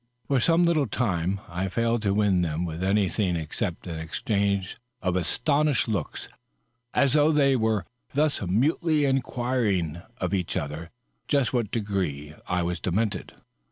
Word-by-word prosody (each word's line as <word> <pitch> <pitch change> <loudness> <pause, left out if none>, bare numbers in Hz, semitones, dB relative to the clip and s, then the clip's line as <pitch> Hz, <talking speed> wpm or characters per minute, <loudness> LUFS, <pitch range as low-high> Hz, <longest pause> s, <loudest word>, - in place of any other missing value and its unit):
For 135 -2 +3
some 170 +6 +4
little 155 -5 +2
time 95 -4 -1
I 90 +3 -2
failed 115 +3 +1
to 100 -2 +1
win 100 -4 +3
from 80 +1 -1
them 80 0 -5
anything 95 -1 +1
except 85 +3 -3
an 85 -3 -5
exchange 100 +3 -1 0.2
of 90 -1 -1
astonished 140 - +1
looks, 110 -3 -3 0.6
as 140 -2 +3
though 150 +1 +5
they 140 -3 +4
were 110 -4 +1 0.3
thus 150 0 +2
mutely 145 - +2
inquiring 120 - 0 0.2
of 90 0 -2
each 90 -3 -1
other 75 +3 -4 0.4
just 140 -4 +2
to 125 - +1
what 115 -4 -1
degree 95 -10 -2
I 90 0 0
was 90 +1 -2
demented. 100 +1 -1
100 Hz, 150 wpm, -26 LUFS, 90-130 Hz, 0.6 s, though